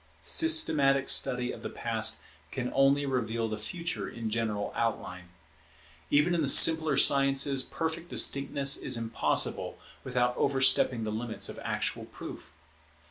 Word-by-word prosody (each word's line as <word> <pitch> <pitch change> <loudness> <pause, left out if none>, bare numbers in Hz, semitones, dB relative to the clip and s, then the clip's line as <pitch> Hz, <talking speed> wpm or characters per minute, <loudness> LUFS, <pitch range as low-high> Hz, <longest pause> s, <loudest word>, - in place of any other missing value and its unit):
Systematic 150 - +2
study 125 0 +1
of - - -11
the - - -7
Past - - -1 0.3
can 125 -1 -6
only 135 +1 +1
reveal 115 -4 -3
the 110 -1 -6
Future 170 +9 -5
in 115 -2 -7
general 110 -2 -4
outline. 90 -6 -4 0.8
Even 150 +5 +1
in 170 - -1
the 140 - -1
simpler 160 -1 +6
sciences 135 0 +3
perfect 165 +3 -6
distinctness 140 0 +3
is - - -1
impossible 115 -1 -2 0.3
without 125 -1 -2
overstepping 130 -3 +1
the 110 - -5
limits 110 +1 -4
of - - -9
actual - - -4
proof. - - -12
135 Hz, 135 wpm, -27 LUFS, 115-145 Hz, 0.8 s, simpler